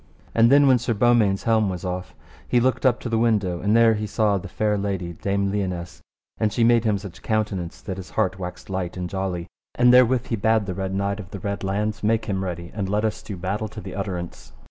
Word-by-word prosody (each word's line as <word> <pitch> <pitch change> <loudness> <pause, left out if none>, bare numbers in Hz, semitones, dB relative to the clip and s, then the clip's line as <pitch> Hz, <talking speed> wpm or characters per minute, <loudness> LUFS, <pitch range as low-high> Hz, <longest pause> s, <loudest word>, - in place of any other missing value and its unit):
And 115 +1 +5
then 145 +1 +7
when 130 -2 +5
Sir 120 -1 -1
Beaumains' 110 -3 +3
helm 110 -3 +2
was 90 0 -5
off, 90 0 -4 0.3
he 120 - +3
looked 130 +2 +2
up 120 -2 +2
to - - -4
the 115 -1 0
window, 105 -7 +1
and 105 +2 +2
there 115 -1 +6
he 105 0 -3
saw 105 -1 +1
the - - -8
fair 105 -1 0
lady 95 -4 -3
Dame 100 +3 -1
Lionesse, 90 -4 -3 0.4
and 110 - +1
she 115 - +1
made 115 0 +4
him 105 -2 +2
such 95 -3 -10
countenance 100 -6 -2
that 95 -3 -5
his 95 -2 -8
heart 95 +1 -1
waxed 90 -1 -7
light 95 -2 -3
and 90 -1 -3
jolly; 95 -2 -3 0.3
and 125 0 +5
therewith 125 0 +5
he 115 - +1
bade 110 0 +2
the 95 - -3
Red 95 +1 -3
Knight 100 +1 -1
of 95 -3 -8
the 100 - -7
Red 100 +1 -3
Launds 105 +2 -1
make 110 +1 +1
him 95 -3 -2
ready, 85 -2 -5
and 100 -3 -3
let 105 +2 +1
us 110 - -2
do 100 - -7
the 85 - -12
battle 100 +4 -2
to 110 +1 -9
the 95 -3 -8
utterance. 90 -8 -5
100 Hz, 240 wpm, -23 LUFS, 95-110 Hz, 0.4 s, then